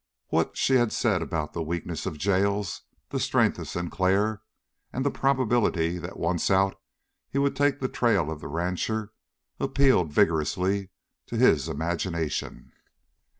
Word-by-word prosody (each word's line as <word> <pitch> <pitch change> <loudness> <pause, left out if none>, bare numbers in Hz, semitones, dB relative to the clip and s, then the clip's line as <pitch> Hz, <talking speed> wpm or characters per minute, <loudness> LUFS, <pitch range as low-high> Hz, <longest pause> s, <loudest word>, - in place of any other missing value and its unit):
What - - 0
she 130 - +4
had 120 -3 +2
said 105 -7 +1
about 80 -2 -3
the 85 - -3
weakness 85 +1 -3
of 80 -5 -4
jails, 100 +1 0 0.3
the - - -2
strength - - +2
of - - -6
Sinclair, 95 +4 0 0.5
and 130 +2 -2
the 140 - +2
probability 120 -11 +1
that - - -7
once 85 0 0
out 95 0 +2 0.5
he - - -3
would 140 0 +2
take 145 0 +2
the 130 - -1
trail 100 - +1
of 80 -1 -6
the - - -6
rancher, 90 +7 -2 0.5
appealed 135 - +3
vigorously 90 +6 +1 0.4
to 115 - -4
his 80 - +4
imagination. 85 +1 -3
95 Hz, 145 wpm, -26 LUFS, 85-115 Hz, 0.5 s, she